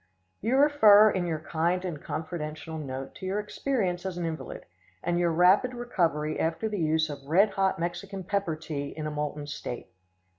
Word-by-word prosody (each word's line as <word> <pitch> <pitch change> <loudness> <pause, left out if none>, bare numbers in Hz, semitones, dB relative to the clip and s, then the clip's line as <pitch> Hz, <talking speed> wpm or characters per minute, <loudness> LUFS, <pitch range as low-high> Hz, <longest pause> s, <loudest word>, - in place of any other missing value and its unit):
You 235 +6 +1
refer 215 -8 +7
in 180 -2 -1
your 160 -2 -1
kind 170 +3 0
and 160 -6 -4
confidential 155 0 -5
note 135 -2 -6
to - - -9
your 195 +2 0
experience 210 -4 -1
as 190 -2 -4
an 175 - -2
invalid, 160 -1 -5 0.4
and 175 0 0
your 175 -1 +2
rapid 185 +9 +4
recovery 165 -10 -1
after 165 +7 0
the 210 -2 -3
use 160 -1 +2
of 140 -2 -8
red 190 +8 +4
hot 195 -1 +1
Mexican 175 +3 -4
pepper 195 -3 -1
tea 145 -3 -5
in 155 - -4
a 155 - -2
molten 150 0 -3
state. 140 -4 -6
175 Hz, 180 wpm, -28 LUFS, 155-195 Hz, 0.4 s, refer